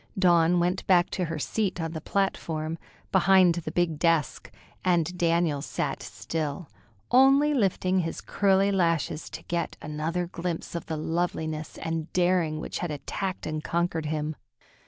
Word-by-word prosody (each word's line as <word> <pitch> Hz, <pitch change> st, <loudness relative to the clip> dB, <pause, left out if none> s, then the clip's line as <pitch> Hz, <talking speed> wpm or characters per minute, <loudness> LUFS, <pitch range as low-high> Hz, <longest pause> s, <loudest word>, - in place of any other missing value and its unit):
Dawn 175 Hz, -2 st, +4 dB
went 180 Hz, +2 st, 0 dB
back 180 Hz, -2 st, +4 dB
to 180 Hz, -, -1 dB
her 165 Hz, -1 st, -4 dB
seat 195 Hz, +4 st, -1 dB
on 165 Hz, -1 st, -2 dB
the 160 Hz, -1 st, -5 dB
platform, 165 Hz, -4 st, -2 dB, 0.3 s
behind 190 Hz, -1 st, +5 dB
the 165 Hz, -2 st, -4 dB
big 165 Hz, -3 st, 0 dB
desk, 165 Hz, -3 st, +1 dB, 0.3 s
and 180 Hz, -1 st, +1 dB
Daniel 170 Hz, -4 st, +1 dB
sat -, -, -3 dB
still, 155 Hz, 0 st, -4 dB, 0.4 s
only 275 Hz, +4 st, +6 dB
lifting 190 Hz, -6 st, +1 dB
his 165 Hz, -2 st, -3 dB
curly 195 Hz, 0 st, +2 dB
lashes 165 Hz, -4 st, 0 dB
to -, -, -8 dB
get 170 Hz, 0 st, -3 dB
another 155 Hz, +4 st, -2 dB
glimpse 175 Hz, -1 st, -4 dB
of 170 Hz, -, -5 dB
the 160 Hz, -, -3 dB
loveliness 160 Hz, -1 st, -2 dB
and 165 Hz, 0 st, -4 dB
daring 175 Hz, -4 st, +2 dB
which -, -, -5 dB
had 175 Hz, -, -2 dB
attacked 185 Hz, +6 st, -4 dB
and 155 Hz, 0 st, -3 dB
conquered 170 Hz, -2 st, -1 dB
him. 155 Hz, 0 st, -2 dB
170 Hz, 150 wpm, -27 LUFS, 160-185 Hz, 0.4 s, only